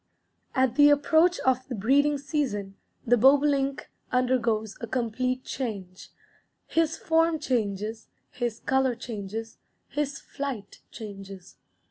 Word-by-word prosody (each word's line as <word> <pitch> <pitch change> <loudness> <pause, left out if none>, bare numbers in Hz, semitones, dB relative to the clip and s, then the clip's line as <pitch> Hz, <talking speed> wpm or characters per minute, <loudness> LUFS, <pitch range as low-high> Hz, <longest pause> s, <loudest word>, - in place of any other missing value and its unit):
_" - - -49 0.6
At 260 -2 +2
the 290 0 +8
approach 320 +5 +4
of 260 0 +1
the 250 - -4
breeding 280 +8 +3
season 270 -9 -2 0.3
the 245 +1 +4
bobolink 275 +2 +3 0.2
undergoes 235 -4 +1
a 230 - -4
complete 255 +2 -1
change; 200 -8 -5 0.6
his 325 0 +1
form 325 0 +2
changes, 220 -5 -2 0.2
his 240 -2 -3
color 265 -2 +2
changes, 225 0 -6 0.3
his 285 -1 -2
flight 260 -8 -6
changes. 195 -4 -10
255 Hz, 115 wpm, -27 LUFS, 220-280 Hz, 0.6 s, the